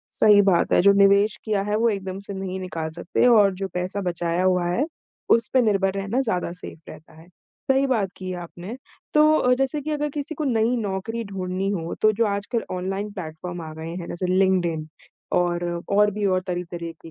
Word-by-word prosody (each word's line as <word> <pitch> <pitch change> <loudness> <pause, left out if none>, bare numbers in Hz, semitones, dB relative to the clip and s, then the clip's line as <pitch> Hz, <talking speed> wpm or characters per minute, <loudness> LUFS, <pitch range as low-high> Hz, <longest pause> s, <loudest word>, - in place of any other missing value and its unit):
सही 210 -1 +6
बात 190 -4 +2
है। - - +5
जो 200 - +7
निवेश 200 +2 +4
किया 210 -3 0
है 210 +1 -1
वो 230 +2 +3
एकदम 195 -3 -3
से 200 - -6
नहीं 190 -1 -4
निकाल 165 -3 -4
सकते 170 +8 0
और 210 -5 +6
जो 195 +1 -4
पैसा 180 +3 -2
बचाया 175 -1 -1
हुआ 180 -1 +2
है, 235 +11 +1 0.5
उस 230 0 +4
पे 260 - +6
निर्भर 195 -3 +2
रहना 200 +6 -1
ज़्यादा 180 -9 -1
सेफ़ 175 -2 -9
रहता 155 +1 -13
है। 170 - -17 0.4
सही 270 +1 +4
बात 215 -8 0
की 185 -1 -5
आपने। 175 +5 -7 0.4
तो 305 0 +6
अ, 250 - +3
जैसे 270 +3 -1
कि 300 +2 -5
अगर 295 0 -1
किसी 295 +2 -5
को 305 - -3
नई 235 -1 +2
नौकरी 225 +2 -3
ढूँढ़नी 190 -1 -3
हो 170 -4 -3
तो 215 0 +5
जो 225 +2 +1
आजकल 205 +3 -2
ऑनलाइन 195 +3 -3
प्लेटफ़ॉर्म 175 -1 -7
आ 155 -1 -7
गए 160 +1 -7
हैं 175 - -6
ना, - - -5
ज 180 +2 -4
लिंक्डइन 180 -4 +1 0.5
और 175 0 +1 0.3
और 210 +1 +5
भी 205 +1 -3
और 185 -1 +2
तरह 180 -1 -2
तरीके 165 -1 -7
195 Hz, 205 wpm, -23 LUFS, 180-220 Hz, 0.5 s, जो